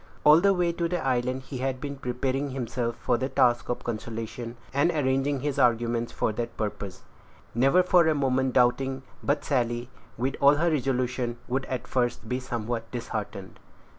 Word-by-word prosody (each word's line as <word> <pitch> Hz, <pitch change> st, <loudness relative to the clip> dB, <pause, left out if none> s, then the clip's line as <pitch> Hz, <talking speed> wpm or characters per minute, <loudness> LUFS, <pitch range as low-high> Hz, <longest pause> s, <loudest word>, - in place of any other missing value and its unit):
All 150 Hz, +3 st, +7 dB
the 200 Hz, +1 st, +5 dB
way 175 Hz, -1 st, +2 dB
to 170 Hz, 0 st, -1 dB
the 175 Hz, -4 st, -2 dB
island 130 Hz, 0 st, 0 dB
he 130 Hz, -1 st, -7 dB
had 130 Hz, 0 st, -1 dB
been 140 Hz, +1 st, -5 dB
preparing 135 Hz, +2 st, -2 dB
himself 120 Hz, -2 st, -2 dB
for 120 Hz, -1 st, 0 dB
the 130 Hz, -, -1 dB
task 120 Hz, -2 st, +2 dB
of 120 Hz, -, -2 dB
consolation, 115 Hz, +1 st, -5 dB, 0.2 s
and 140 Hz, +5 st, +3 dB
arranging 135 Hz, -3 st, +1 dB
his 145 Hz, 0 st, -1 dB
arguments 120 Hz, -1 st, +2 dB
for -, -, 0 dB
that 115 Hz, +2 st, -4 dB
purpose, 100 Hz, -3 st, -4 dB, 0.5 s
never 135 Hz, +10 st, +4 dB
for 180 Hz, -2 st, +5 dB
a 160 Hz, -, +3 dB
moment 130 Hz, -2 st, +1 dB
doubting 130 Hz, +2 st, +2 dB, 0.2 s
but 145 Hz, +1 st, 0 dB
Sally, 120 Hz, -2 st, 0 dB, 0.3 s
with 130 Hz, +3 st, -1 dB
all 140 Hz, +1 st, +7 dB
her 170 Hz, +3 st, +2 dB
resolution, 125 Hz, -3 st, -1 dB
would 130 Hz, +2 st, -1 dB
at 130 Hz, -, -4 dB
first 120 Hz, -3 st, -1 dB
be 125 Hz, +3 st, -1 dB
somewhat 120 Hz, -2 st, -4 dB
disheartened. 110 Hz, -5 st, -5 dB
130 Hz, 170 wpm, -27 LUFS, 120-140 Hz, 0.5 s, All